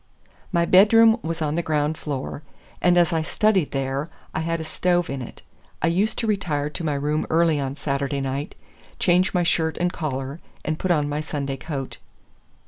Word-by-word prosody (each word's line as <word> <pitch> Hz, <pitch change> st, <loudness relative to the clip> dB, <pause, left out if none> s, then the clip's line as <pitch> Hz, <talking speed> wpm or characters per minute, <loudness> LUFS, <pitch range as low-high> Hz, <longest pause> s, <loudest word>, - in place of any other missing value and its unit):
My 170 Hz, -2 st, +2 dB
bedroom 225 Hz, +5 st, +6 dB
was 165 Hz, 0 st, -3 dB
on 150 Hz, -1 st, 0 dB
the 170 Hz, -, 0 dB
ground 155 Hz, -1 st, 0 dB
floor, 145 Hz, -1 st, -5 dB, 0.4 s
and 175 Hz, 0 st, +4 dB
as 175 Hz, 0 st, +4 dB
I 160 Hz, -, +1 dB
studied 190 Hz, 0 st, +2 dB
there, 135 Hz, +2 st, -2 dB, 0.2 s
I -, -, -1 dB
had 165 Hz, +1 st, -1 dB
a -, -, -4 dB
stove 175 Hz, +1 st, 0 dB
in 135 Hz, -1 st, -4 dB
it. 125 Hz, -, -10 dB, 0.4 s
I -, -, 0 dB
used 205 Hz, +5 st, +1 dB
to 230 Hz, -, -1 dB
retire 160 Hz, -9 st, -1 dB
to 170 Hz, -, -6 dB
my 150 Hz, -3 st, 0 dB
room 150 Hz, +2 st, -1 dB
early 165 Hz, -2 st, +3 dB
on 135 Hz, -1 st, -3 dB
Saturday 140 Hz, -1 st, -2 dB
night, 135 Hz, +2 st, -3 dB, 0.4 s
change 185 Hz, +1 st, +2 dB
my 175 Hz, -, +3 dB
shirt 160 Hz, -2 st, +1 dB
and 180 Hz, 0 st, 0 dB
collar 140 Hz, -2 st, -4 dB, 0.3 s
and 155 Hz, 0 st, -2 dB
put 185 Hz, -, -2 dB
on 150 Hz, -4 st, +2 dB
my 145 Hz, +1 st, -2 dB
Sunday 145 Hz, -3 st, -3 dB
coat. 135 Hz, -2 st, -5 dB
155 Hz, 190 wpm, -23 LUFS, 145-175 Hz, 0.4 s, bedroom